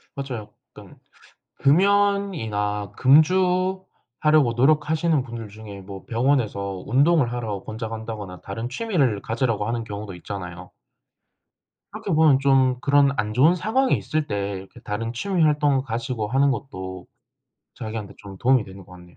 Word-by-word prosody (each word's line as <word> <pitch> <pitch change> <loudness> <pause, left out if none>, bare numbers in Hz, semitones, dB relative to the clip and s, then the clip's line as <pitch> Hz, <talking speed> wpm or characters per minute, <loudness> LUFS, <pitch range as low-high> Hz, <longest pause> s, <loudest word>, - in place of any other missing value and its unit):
맞아요. 130 -6 -5 0.2
그러니깐 - - -14 0.6
금연이나 155 - +1
금주하려고 155 -4 +2
노력하시는 155 +2 +2
분들 115 -3 -7
중에 105 -2 -10
뭐 95 0 -10
병원에서 110 -7 0
운동을 140 0 +3
하라고 110 -5 -4
권장한다거나 110 -4 -6
다른 115 +4 -5
취미를 140 - 0
가지라고 115 -2 -1
하는 115 0 -2
경우도 100 -1 -7
있잖아요. 90 -1 -8 1.2
그렇게 - - -5
보면 155 -4 +5
좀 135 -2 +3
그런 140 -1 +4
안 105 0 -1
좋은 145 +9 +5
상황이 255 +8 +1
있을 155 -1 -2
때 100 -7 -2
이렇게 95 0 -12
다른 115 +3 -3
취미 190 +7 -1
활동을 145 -3 +3
가지고 120 -2 -3
하는 135 +5 +3
것도 95 -9 -6 0.7
자기한테 110 -2 -6
좀 100 -2 -11
도움이 130 0 +3
되는 95 -1 -12
것 90 - -17
같네요. 90 -1 -15
120 Hz, 340 characters per minute, -23 LUFS, 105-150 Hz, 1.2 s, 보면